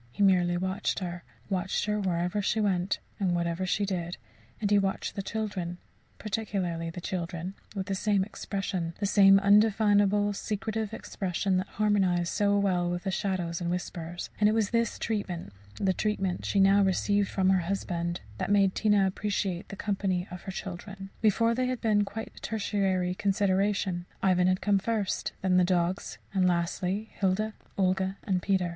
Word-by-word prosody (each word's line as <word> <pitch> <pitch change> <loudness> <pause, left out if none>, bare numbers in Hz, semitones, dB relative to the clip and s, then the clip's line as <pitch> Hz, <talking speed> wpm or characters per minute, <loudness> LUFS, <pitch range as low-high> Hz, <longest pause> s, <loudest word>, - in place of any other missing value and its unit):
He 205 - 0
merely 180 -2 +4
watched 190 +3 -1
her 175 -2 -4 0.2
watched 190 +1 -1
her 210 0 0
wherever 180 +1 0
she 215 +2 0
went, 190 -2 +1 0.2
and 185 -3 +1
whatever 170 +2 -1
she 180 +4 +1
did; 175 -3 -3 0.4
and 205 -2 -1
he 205 - +6
watched 195 -1 -1
the 200 - -3
children 195 -5 -3 0.4
particularly 195 -6 -2
the 165 - -7
children 175 0 -4 0.2
with 190 -1 -2
the 195 - -2
same 200 0 +2
expression, 190 -4 -4
the 205 - 0
same 195 -1 +7
undefinable 205 0 +4
secretive 215 +1 -3
expression 190 -3 -1
that 185 +1 -1
harmonized 190 -5 +1
so 205 0 +2
well 180 -3 +1
with 175 0 -3
the 190 - -1
shadows 185 -4 -2
and 170 - -1
whispers. 175 -1 -4
And 210 0 +5
it - - +2
was 220 -3 +1
this 230 -1 +1
treatment 185 - -3 0.2
the 190 -2 +1
treatment 195 -3 -1
she 200 - +1
now 195 +1 +6
received 200 +1 +2
from 190 -1 +2
her 190 - +4
husband 175 -3 -2 0.2
that - - -2
made 200 -2 +4
Tina 210 -2 +3
appreciate 190 -2 -2
the - - -6
company 195 -3 -1
of 180 -1 -7
her 190 - -4
children. 195 +1 -7
Before, 230 +2 +3
they 255 +1 0
had 255 -1 -2
been 210 -3 +2
quite 220 +3 -6
a - - -11
tertiary 195 -4 0
consideration 195 -2 0 0.2
Ivan 180 -1 +4
had 185 0 +2
come 200 -1 +3
first; 210 -2 -1
then 185 -1 +3
the 180 - +5
dogs; 180 +1 0 0.2
and 185 -2 +3
lastly, 180 +4 -1
Hilda, 205 +3 +1 0.2
Olga, 190 0 +1
and 185 -3 0
Peter. 190 -2 +1
195 Hz, 170 wpm, -28 LUFS, 180-205 Hz, 0.4 s, same